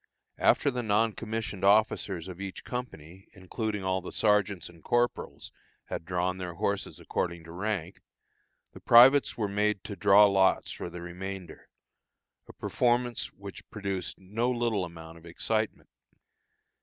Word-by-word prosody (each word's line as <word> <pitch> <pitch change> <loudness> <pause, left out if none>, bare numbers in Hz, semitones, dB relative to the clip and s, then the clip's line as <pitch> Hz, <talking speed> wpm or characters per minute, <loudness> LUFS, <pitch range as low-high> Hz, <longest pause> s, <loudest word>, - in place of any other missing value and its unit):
After 140 - +3
the 125 -1 -2
non 110 0 +2
commissioned 110 -3 -5
officers 100 -4 +2
of 90 0 -8
each 95 -1 -6
company, 95 -8 -7
including 105 +2 -4
all 95 0 0
the 90 - -8
sergeants 105 -4 +1
and 85 -2 -16
corporals, 120 0 -1 0.4
had - - -5
drawn 90 +1 -1
their 90 -2 -5
horses 100 +3 -2
according 85 -1 -3
to 80 - -11
rank, 95 -1 -3 0.7
the - - -11
privates 130 +4 +6
were 110 -3 0
made 105 0 0
to 100 - -6
draw 100 +1 +6
lots 95 -1 +3
for - - -6
the 90 0 -8
remainder 90 +1 -8 0.8
a - - -12
performance 120 -1 0
which 100 0 -11
produced 100 -4 -4
no 105 +6 -1
little 120 -6 0
amount 80 -1 -11
of 80 - -18
excitement. 110 +6 -2
100 Hz, 145 wpm, -29 LUFS, 90-110 Hz, 0.8 s, privates